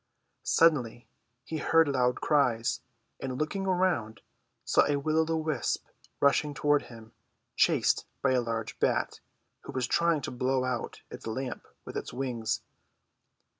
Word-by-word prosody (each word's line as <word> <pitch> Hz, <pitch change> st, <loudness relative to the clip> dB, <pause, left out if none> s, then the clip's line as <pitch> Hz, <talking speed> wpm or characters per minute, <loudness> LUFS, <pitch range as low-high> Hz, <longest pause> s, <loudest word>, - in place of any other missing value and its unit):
Suddenly 130 Hz, -8 st, +3 dB, 0.4 s
he 160 Hz, -, -4 dB
heard 165 Hz, 0 st, +4 dB
loud 125 Hz, -3 st, +1 dB
cries, 125 Hz, -6 st, +2 dB, 0.4 s
and 130 Hz, -1 st, -4 dB
looking 195 Hz, +7 st, -2 dB
around 175 Hz, -13 st, +1 dB, 0.4 s
saw -, -, +4 dB
a 145 Hz, -, +2 dB
will 155 Hz, +3 st, +1 dB
o' 160 Hz, -, +3 dB
the 165 Hz, 0 st, 0 dB
wisp 155 Hz, -5 st, -1 dB, 0.3 s
rushing 145 Hz, +1 st, +3 dB
toward 145 Hz, +1 st, +3 dB
him, 115 Hz, -2 st, -13 dB, 0.4 s
chased -, -, +3 dB, 0.2 s
by 135 Hz, -, +4 dB
a 130 Hz, -1 st, +3 dB
large 115 Hz, -2 st, -4 dB
bat, -, -, +1 dB, 0.5 s
who -, -, -6 dB
Avas 130 Hz, -1 st, -1 dB
trying 170 Hz, -1 st, +2 dB
to -, -, -4 dB
blow 130 Hz, +1 st, 0 dB
out 125 Hz, -2 st, -3 dB
its -, -, -8 dB
lamp 125 Hz, +3 st, -4 dB, 0.2 s
Avith -, -, -6 dB
its -, -, -5 dB
Avings. 120 Hz, -4 st, -2 dB
135 Hz, 145 wpm, -29 LUFS, 120-155 Hz, 0.5 s, heard